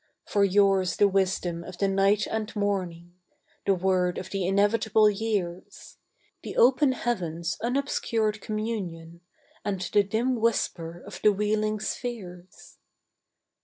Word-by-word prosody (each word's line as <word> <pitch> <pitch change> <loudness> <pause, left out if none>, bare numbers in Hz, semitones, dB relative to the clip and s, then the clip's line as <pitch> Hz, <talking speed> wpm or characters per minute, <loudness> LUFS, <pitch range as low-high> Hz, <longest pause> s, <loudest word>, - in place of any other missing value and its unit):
For 205 - +1
yours 195 -1 +3
the 205 - +4
wisdom 185 -3 0
of 175 - -10
the 200 - +1
night 195 +2 +2
and 220 0 -4
morning, 180 -4 -2 0.5
The 195 - +4
word 180 -1 +1
of - - -6
the 195 -3 -1
inevitable 210 +2 +3
years, 195 -4 -4 0.4
The - - -7
open 260 +2 +5
Heaven's 175 -7 -2
unobscured 230 -4 -1
communion, 185 -7 -5 0.4
And 200 -2 -2
the 190 +3 +2
dim 230 +6 0
whisper 175 -7 -1
of - - -9
the 210 - +5
wheeling 215 +1 0
spheres. 190 -7 -7
200 Hz, 125 wpm, -27 LUFS, 180-215 Hz, 0.5 s, open